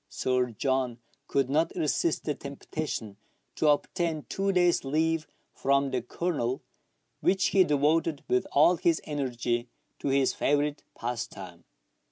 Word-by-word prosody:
Sir 125 Hz, -1 st, 0 dB
John 130 Hz, +1 st, -1 dB, 0.3 s
could 135 Hz, -2 st, +1 dB
not 155 Hz, +5 st, +1 dB
resist 160 Hz, 0 st, 0 dB
the 150 Hz, -, 0 dB
temptation 140 Hz, -6 st, -5 dB, 0.4 s
to 155 Hz, -, +1 dB
obtain 155 Hz, +1 st, +1 dB
two 195 Hz, 0 st, 0 dB
days' 175 Hz, -2 st, +3 dB
leave 160 Hz, +3 st, 0 dB, 0.3 s
from 140 Hz, 0 st, +1 dB
the 130 Hz, -2 st, 0 dB
Colonel, 130 Hz, -1 st, -2 dB, 0.6 s
which 190 Hz, 0 st, +2 dB
he 195 Hz, -, +5 dB
devoted 150 Hz, 0 st, +1 dB
with 125 Hz, -, +1 dB
all 170 Hz, +5 st, +5 dB
his 165 Hz, 0 st, +2 dB
energy 125 Hz, -4 st, -2 dB, 0.3 s
to -, -, -4 dB
his 135 Hz, -1 st, +3 dB
favourite 145 Hz, +1 st, +1 dB
pastime. 100 Hz, -7 st, -6 dB
140 Hz, 130 wpm, -28 LUFS, 125-160 Hz, 0.6 s, he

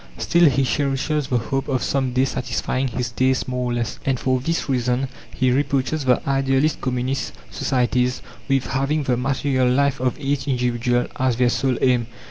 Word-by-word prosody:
Still 170 Hz, -, +4 dB
he 135 Hz, 0 st, +1 dB
cherishes 140 Hz, +2 st, 0 dB
the 125 Hz, -, +1 dB
hope 135 Hz, +3 st, -2 dB
of 130 Hz, -4 st, 0 dB
some 135 Hz, -2 st, 0 dB
day 130 Hz, +1 st, +2 dB
satisfying 130 Hz, 0 st, -2 dB
his 120 Hz, -1 st, -3 dB
tastes 130 Hz, +1 st, +1 dB
more 125 Hz, -1 st, -2 dB
or -, -, -1 dB
less, 120 Hz, -2 st, -3 dB
and 135 Hz, -2 st, 0 dB
for 130 Hz, -1 st, +1 dB
this 165 Hz, +6 st, -2 dB
reason 125 Hz, 0 st, 0 dB, 0.2 s
he 130 Hz, -1 st, +1 dB
reproaches 140 Hz, +2 st, 0 dB
the 125 Hz, +1 st, +2 dB
idealist 135 Hz, +2 st, +1 dB
Communist 130 Hz, +1 st, -2 dB, 0.2 s
societies 125 Hz, 0 st, 0 dB, 0.3 s
with 135 Hz, -2 st, +2 dB
having 140 Hz, +3 st, 0 dB
the 130 Hz, -2 st, +1 dB
material 130 Hz, 0 st, +1 dB
life 140 Hz, +1 st, +2 dB
of 130 Hz, +1 st, -1 dB
each 140 Hz, 0 st, -2 dB
individual 125 Hz, -1 st, +1 dB
as 130 Hz, -2 st, +2 dB
their 125 Hz, +1 st, +3 dB
sole 130 Hz, -3 st, 0 dB
aim. 125 Hz, -3 st, +2 dB
130 Hz, 175 wpm, -22 LUFS, 125-135 Hz, 0.3 s, Still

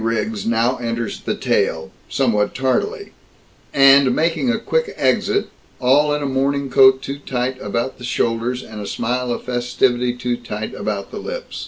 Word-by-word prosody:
Riggs 110 Hz, -2 st, -1 dB
now 115 Hz, +2 st, +2 dB
enters 115 Hz, -2 st, -3 dB
the -, -, -3 dB
tale 80 Hz, +4 st, 0 dB, 0.2 s
somewhat 110 Hz, -6 st, +1 dB
tardily, 400 Hz, -, -1 dB, 0.6 s
and 135 Hz, -1 st, +6 dB
making 165 Hz, +10 st, +1 dB
a 240 Hz, -, +2 dB
quick 475 Hz, -, -1 dB
exit, 405 Hz, -, +1 dB, 0.3 s
all 140 Hz, +4 st, +4 dB
in 150 Hz, -, -3 dB
a -, -, -1 dB
morning 135 Hz, +1 st, 0 dB
coat 130 Hz, 0 st, +6 dB
too 140 Hz, +1 st, -5 dB
tight 130 Hz, -1 st, -3 dB
about 115 Hz, +6 st, -3 dB
the -, -, -11 dB
shoulders, 120 Hz, +1 st, -1 dB
and 110 Hz, -1 st, -8 dB
a 100 Hz, -, -6 dB
smile 125 Hz, +1 st, -2 dB
of -, -, -3 dB
festivity 120 Hz, 0 st, 0 dB
too 120 Hz, 0 st, -2 dB
tight 110 Hz, -3 st, -6 dB
about 100 Hz, -1 st, -4 dB
the -, -, -6 dB
lips. -, -, -6 dB
125 Hz, 165 wpm, -20 LUFS, 115-140 Hz, 0.6 s, and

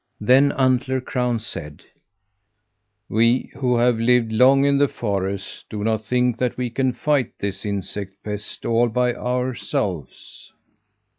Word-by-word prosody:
Then 130 Hz, +6 st, +4 dB
Antler 130 Hz, 0 st, +1 dB
Crown 125 Hz, -2 st, -1 dB
said: 85 Hz, -9 st, -7 dB, 1.2 s
"We 115 Hz, +3 st, +2 dB
who 125 Hz, -3 st, +1 dB
have 120 Hz, -1 st, +2 dB
lived 115 Hz, -1 st, +3 dB
long 130 Hz, +5 st, +5 dB
in 140 Hz, -1 st, +3 dB
the 145 Hz, -, +4 dB
forest 100 Hz, -4 st, -4 dB
do 105 Hz, -1 st, -5 dB
not 110 Hz, 0 st, -1 dB
think 125 Hz, 0 st, +1 dB
that 125 Hz, -1 st, -1 dB
we 125 Hz, -2 st, -2 dB
can 130 Hz, +1 st, +1 dB
fight 140 Hz, -1 st, 0 dB
this 100 Hz, -1 st, -4 dB
insect 100 Hz, -1 st, -4 dB
pest 105 Hz, -1 st, -6 dB
all 115 Hz, +1 st, +2 dB
by 125 Hz, +1 st, +1 dB
ourselves." 115 Hz, -, -4 dB
120 Hz, 135 wpm, -22 LUFS, 105-125 Hz, 1.2 s, long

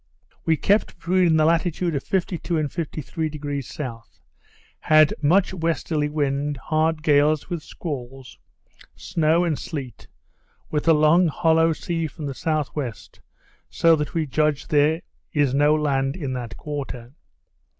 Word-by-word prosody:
We 160 Hz, -1 st, +3 dB
kept 205 Hz, +7 st, +1 dB
between 175 Hz, -2 st, +2 dB
the 155 Hz, -, +4 dB
latitude 170 Hz, +1 st, +1 dB
of 140 Hz, -, -2 dB
52° 175 Hz, -3 st, -1 dB
and 150 Hz, -3 st, -2 dB
53° 150 Hz, -4 st, -4 dB, 0.2 s
S., -, -, -35 dB, 0.6 s
had 155 Hz, -1 st, +5 dB
much 180 Hz, +6 st, +3 dB
westerly 160 Hz, -3 st, -1 dB
wind, 145 Hz, -1 st, -1 dB
hard 155 Hz, +2 st, 0 dB
gales, 150 Hz, +1 st, +2 dB
with 170 Hz, -2 st, -2 dB
squalls, 135 Hz, -6 st, -7 dB, 0.6 s
snow 165 Hz, 0 st, +1 dB
and 165 Hz, -4 st, -1 dB
sleet, 135 Hz, -7 st, -7 dB, 0.6 s
with 150 Hz, +1 st, -1 dB
a 165 Hz, -, +7 dB
long 155 Hz, +4 st, +4 dB
hollow 165 Hz, +1 st, +3 dB
sea 165 Hz, 0 st, -3 dB
from 155 Hz, 0 st, -8 dB
the 140 Hz, -, -3 dB
S.W., 150 Hz, -2 st, -2 dB, 0.8 s
so 165 Hz, -1 st, +4 dB
that 150 Hz, +2 st, -4 dB
we 160 Hz, -2 st, +1 dB
judged 150 Hz, +2 st, 0 dB
there 155 Hz, +2 st, +3 dB, 0.3 s
is 145 Hz, -4 st, +2 dB
no 145 Hz, +2 st, +4 dB
land 135 Hz, -3 st, 0 dB
in 140 Hz, -8 st, -4 dB
that 120 Hz, -4 st, -6 dB
quarter. 135 Hz, -4 st, -6 dB
155 Hz, 135 wpm, -23 LUFS, 145-165 Hz, 0.8 s, a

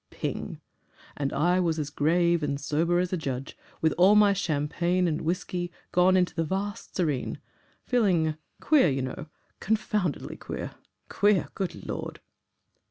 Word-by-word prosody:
Ping! -, -, -5 dB, 0.6 s
And 140 Hz, -1 st, -2 dB
I 175 Hz, +5 st, +2 dB
was 165 Hz, -3 st, +1 dB
as 150 Hz, -2 st, -3 dB
grave 170 Hz, +3 st, +2 dB
and 140 Hz, -1 st, -1 dB
sober 160 Hz, +4 st, +1 dB
as 180 Hz, +1 st, 0 dB
a -, -, +1 dB
judge, 135 Hz, -4 st, -4 dB, 0.3 s
with 160 Hz, -1 st, +3 dB
all 190 Hz, +4 st, +7 dB
my 205 Hz, -1 st, +6 dB
champagne 175 Hz, +1 st, 0 dB
and 155 Hz, -2 st, -1 dB
whisky 175 Hz, +1 st, -2 dB, 0.2 s
gone 185 Hz, +1 st, +4 dB
into 180 Hz, -1 st, +1 dB
the 165 Hz, -, 0 dB
vast 200 Hz, +6 st, -4 dB
serene. 150 Hz, -8 st, -1 dB, 0.5 s
Feeling 180 Hz, -11 st, +2 dB, 0.2 s
queer, 285 Hz, -, +4 dB
you 135 Hz, -1 st, -1 dB
know 130 Hz, +4 st, -5 dB, 0.3 s
confoundedly 210 Hz, -, -1 dB
QUEER! -, -, -6 dB, 0.4 s
Queer! 205 Hz, -2 st, +2 dB
Good 190 Hz, -3 st, -5 dB
Lord!" -, -, -5 dB
175 Hz, 145 wpm, -27 LUFS, 150-185 Hz, 0.6 s, all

